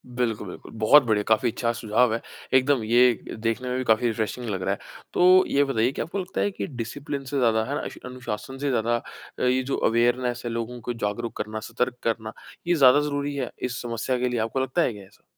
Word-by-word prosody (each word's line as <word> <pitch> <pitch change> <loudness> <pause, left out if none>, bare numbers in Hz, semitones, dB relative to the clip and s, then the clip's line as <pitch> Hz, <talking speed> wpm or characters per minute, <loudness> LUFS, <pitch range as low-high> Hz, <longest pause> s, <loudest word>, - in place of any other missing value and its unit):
बिल्कुल, 115 -4 -1
बिल्कुल, 90 - -10
बहुत 135 +6 +7
बढ़िया, 105 -3 +1
काफ़ी 110 +2 +3
अच्छा 115 +1 -1
सुझाव 115 +1 +2
है। 115 - -2 0.3
एकदम 130 -2 +3
ये 120 +3 +5 0.2
देखने 115 +3 -2
में 125 - -1
भी 130 - -1
काफ़ी 115 0 +3
रिफ्रेशिंग 115 +1 -2
लग 95 -3 -2
रहा - - 0
है। - - -6 0.3
तो 185 +1 +6
ये 140 - +3
बताइए, 125 -3 +1
क्या - - -3
आपको 195 +4 -4
लगता 180 - -3
है 205 - +1
कि - - -4
डिसिप्लिन 135 +3 -5
से 140 +2 -3
ज़्यादा, 115 -3 +3
है 140 - -3
ना, - - -2
इश - - -10
अनुशासन 125 0 -6
से 140 +1 -1
ज़्यादा 120 -1 +1 0.4
अ, - - -4
ये 130 +1 +2
जो 135 +2 -2
अवेयरनेस 120 +1 +1
है, 120 - -2
लोगों 115 +1 -4
को 120 +2 -3
जागरूक 115 +1 -3
करना, 110 0 -4
सतर्क 125 0 -1
करना, 110 -1 -2 0.3
ये 175 - +3
ज़्यादा 135 -2 +7
ज़रूरी 145 -1 -2
है 130 -3 -3
इस 125 -1 -2
समस्या 120 +1 -2
के 125 0 +1
लिए? 120 - -1
आपको 115 +4 -1
लगता 130 +6 0
है 125 - +1
क्या 100 - -11
ऐसा? 95 - -24
125 Hz, 230 wpm, -25 LUFS, 115-135 Hz, 0.4 s, बहुत